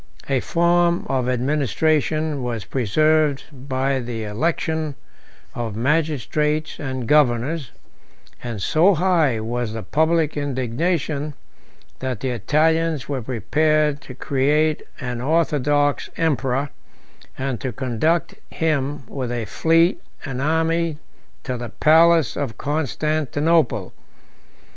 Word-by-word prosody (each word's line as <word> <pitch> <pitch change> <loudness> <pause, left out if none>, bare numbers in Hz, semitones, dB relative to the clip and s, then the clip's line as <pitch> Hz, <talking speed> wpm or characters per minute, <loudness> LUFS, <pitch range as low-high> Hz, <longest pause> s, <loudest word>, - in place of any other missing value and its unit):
38 135 - 0
A - - -1
form 170 0 +2
of 130 -2 0
administration 150 +3 0
was 120 -4 -3
preserved 150 +4 +2
by 135 0 -1
the 120 -2 -4
election 155 +6 -1 0.6
of 115 -3 -4
magistrates 150 +3 0
and 130 -5 -4
governors; 140 0 +2 0.7
and 115 -5 -5
so 180 +5 +4
high 165 -8 +2
was 115 0 -3
the 110 -1 -5
public 160 0 +1
indignation, 145 +2 -1 0.6
that 130 -4 -3
the 130 - -2
Italians 155 +5 +1
were 140 -3 -2
prepared 150 +5 +1
to 130 - -10
create 150 +4 +1 0.2
an 125 -3 -4
orthodox 145 -1 +1
emperor, 140 -3 0 0.7
and 130 -2 -3
to 130 - -2
conduct 130 +8 0 0.2
him 145 -3 -1
with 130 -3 -4
a 120 -2 -2
fleet 165 - +2 0.2
and 135 -2 -4
army 160 +1 +1 0.5
to 130 -2 -3
the 120 -1 -6
palace 160 +1 +4
of 125 -8 -3
Constantinople. 155 +1 0
145 Hz, 110 wpm, -22 LUFS, 125-155 Hz, 0.7 s, so